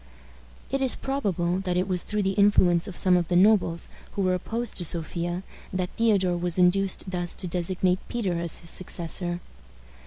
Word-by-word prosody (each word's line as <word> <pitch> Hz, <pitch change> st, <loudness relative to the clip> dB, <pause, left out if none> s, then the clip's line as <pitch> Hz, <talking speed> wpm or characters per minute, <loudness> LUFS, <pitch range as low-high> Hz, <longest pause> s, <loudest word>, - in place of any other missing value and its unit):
It 275 Hz, -, 0 dB
is 260 Hz, -2 st, +2 dB
probable 190 Hz, -10 st, -1 dB
that 180 Hz, -2 st, -2 dB
it 185 Hz, +1 st, 0 dB
was 180 Hz, -2 st, -1 dB
through 210 Hz, +2 st, -2 dB
the 195 Hz, -, +1 dB
influence 195 Hz, -3 st, +3 dB
of 195 Hz, -, -7 dB
some 185 Hz, -1 st, +5 dB
of 175 Hz, -2 st, +1 dB
the 175 Hz, -, 0 dB
nobles 180 Hz, -3 st, +3 dB, 0.3 s
who 200 Hz, -, -1 dB
were 185 Hz, 0 st, +2 dB
opposed 225 Hz, +6 st, -3 dB
to 180 Hz, -, +1 dB
Sophia 175 Hz, +2 st, -2 dB, 0.3 s
that 185 Hz, -1 st, -2 dB
Theodore 200 Hz, -6 st, +2 dB
was 175 Hz, 0 st, 0 dB
induced 185 Hz, +1 st, +2 dB
thus 175 Hz, -1 st, -1 dB
to -, -, -5 dB
designate 180 Hz, +1 st, 0 dB
Peter 195 Hz, -8 st, -2 dB
as 170 Hz, -1 st, -2 dB
his 170 Hz, -, -4 dB
successor. 175 Hz, 0 st, -1 dB
180 Hz, 180 wpm, -26 LUFS, 175-195 Hz, 0.3 s, some